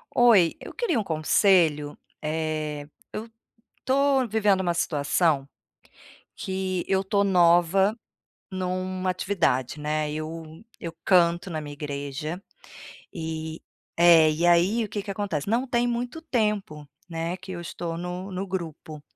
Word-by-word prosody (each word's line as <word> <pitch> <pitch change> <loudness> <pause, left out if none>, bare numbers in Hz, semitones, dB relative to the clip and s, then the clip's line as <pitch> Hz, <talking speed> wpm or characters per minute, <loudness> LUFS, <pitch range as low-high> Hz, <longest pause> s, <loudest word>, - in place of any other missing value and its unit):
Oi, 215 -9 +5
eu - - -10
queria 360 - 0
um - - -1
conselho, 155 -3 +2 0.2
eh, 155 -1 -3 0.3
eu 220 +2 -5 0.5
estou 270 0 +2
vivendo 205 -3 +2
uma 175 -2 0
situação, 150 -2 +1 0.9
que 190 -1 -2
eu 190 0 +2
estou 200 +1 +1
nova 180 +2 +4 0.6
numa 185 0 -2
atividade, 165 -8 0
né, 150 0 -1
eu 160 +3 -7
eu 170 - -5
canto 175 0 +3
na 155 -1 -3
minha 145 -1 -7
igreja, 145 +3 -5 0.7
e 160 -1 -5 0.4
é, 165 -2 +7
e 160 +3 0
aí 175 +7 +4
o 215 - -3
que 205 0 -4
que 200 - -7
acontece, 195 -7 -3
não 235 +5 +1
tem 240 -1 +1
muito 245 +6 -3
tempo 210 - -1 0.2
né, 165 +1 -3
que 185 0 -9
eu 175 - -5
estou 170 -1 -5
no 180 +2 -5
no 185 +2 -3
grupo... 160 -5 -6
175 Hz, 135 wpm, -26 LUFS, 155-200 Hz, 0.9 s, é